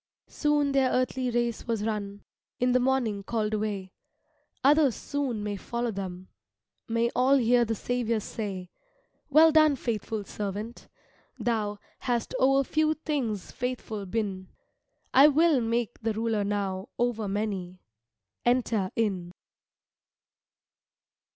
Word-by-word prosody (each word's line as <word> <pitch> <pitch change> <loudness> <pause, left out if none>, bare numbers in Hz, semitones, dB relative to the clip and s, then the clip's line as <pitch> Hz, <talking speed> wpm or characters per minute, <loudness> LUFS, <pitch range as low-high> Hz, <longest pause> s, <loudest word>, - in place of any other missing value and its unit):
Soon 295 -2 +1
their 270 -2 +3
earthly 255 0 0
race 240 -1 -1
was 225 -3 -1
run, 205 -2 -3 0.4
In 250 0 +2
the 255 - +4
morning 245 -5 +1
called 215 +1 -2
away; 205 -3 -2 0.7
Others 285 -2 +5
soon 265 -7 -3
may 205 -1 -2
follow 235 +3 -3
them, 185 -2 -6 0.6
May 230 +1 +1
all 265 +2 +4
hear 240 -1 +4
the 225 0 -1
Saviour 235 0 -1
say, 195 -4 -5 0.6
"Well 315 +3 +7
done, 310 -2 +5
faithful 220 -3 -3
servant; 210 +3 -5 0.5
thou 215 -3 -1 0.2
Hast 240 -3 -1
o'er 270 +1 +4
few 310 +3 +1
things 260 - -3
faithful 230 -5 -4
been, 195 -2 -3 0.7
I 275 +3 +8
will 305 -2 +4
make 230 0 -1
the 225 0 0
ruler 220 -1 0
now 200 0 -2
Over 235 -3 0
many 195 -3 -3 0.6
enter 235 -5 +1
in." 190 -6 -1
230 Hz, 120 wpm, -28 LUFS, 205-255 Hz, 0.7 s, I